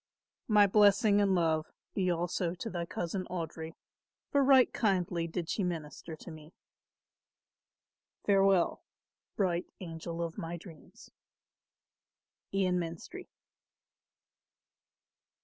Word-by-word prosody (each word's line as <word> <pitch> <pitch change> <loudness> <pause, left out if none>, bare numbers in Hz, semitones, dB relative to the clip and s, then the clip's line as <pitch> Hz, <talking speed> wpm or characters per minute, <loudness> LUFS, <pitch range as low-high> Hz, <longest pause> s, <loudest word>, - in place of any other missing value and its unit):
"My 210 -2 +6
blessing 205 +1 +5
and 195 -2 +3
love 160 -3 +1 0.2
be 185 -3 0
also 175 0 -1
to 225 - -5
thy 170 -2 -3
cousin 180 +3 -3
Audry, 165 -2 -5 0.6
for 280 -1 +4
right 265 -1 +6
kindly 180 -5 0
did 165 0 -4
she 200 - -1
minister 160 -2 -5
to 165 - -11
me. 155 +1 -12 1.7
"Farewell, 195 -3 +3 0.5
bright 180 -3 0
angel 170 -1 -5
of 165 +3 -5
my 170 -1 -4
dreams. 165 -3 -14 1.4
"IAN 185 -2 +1
MENSTRIE. 170 - -7
175 Hz, 100 wpm, -31 LUFS, 165-195 Hz, 1.7 s, My